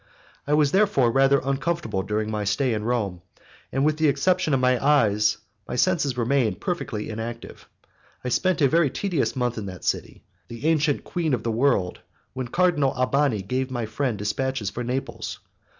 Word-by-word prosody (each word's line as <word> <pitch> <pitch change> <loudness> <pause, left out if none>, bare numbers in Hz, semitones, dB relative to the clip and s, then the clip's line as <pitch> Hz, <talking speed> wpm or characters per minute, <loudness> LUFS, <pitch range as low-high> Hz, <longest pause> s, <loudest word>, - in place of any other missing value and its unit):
I 150 - +3
was 150 -2 +3
therefore 190 - +3
rather 135 +2 +4
uncomfortable 135 - -1
during 105 +2 -2
my 105 -1 -2
stay 115 +5 +1
in 105 -1 -3
Rome, 105 -7 -1 0.5
and 135 +1 +1
with 155 0 +2
the 155 0 +3
exception 180 +3 +2
of 135 - +3
my 125 0 +2
eyes 105 -8 +3 0.3
my - - -4
senses 145 -3 +1
remained 120 -5 +1
perfectly 120 -12 -3
inactive. 115 +2 -7
I - - -30 0.4
had - - 0
spent 185 -3 +1
a - - +7
very 165 +1 +3
tedious 175 -1 -1
month 125 -3 -1
in 100 - -5
that 90 -4 -8
city, - - -2 0.2
the 120 +4 -8
ancient 155 -3 +2
queen 160 -6 -1
of 115 - -7
the 115 - -1
world, 110 -7 +1 0.3
when 130 -1 -4
Cardinal 155 -2 +2
Albani 130 -4 +1
gave 130 +6 -2
my 120 -3 -3
friend 115 +1 -2
dispatches 105 +1 -2
for 120 - -4
Naples. 125 +3 -4
130 Hz, 180 wpm, -24 LUFS, 110-145 Hz, 0.5 s, a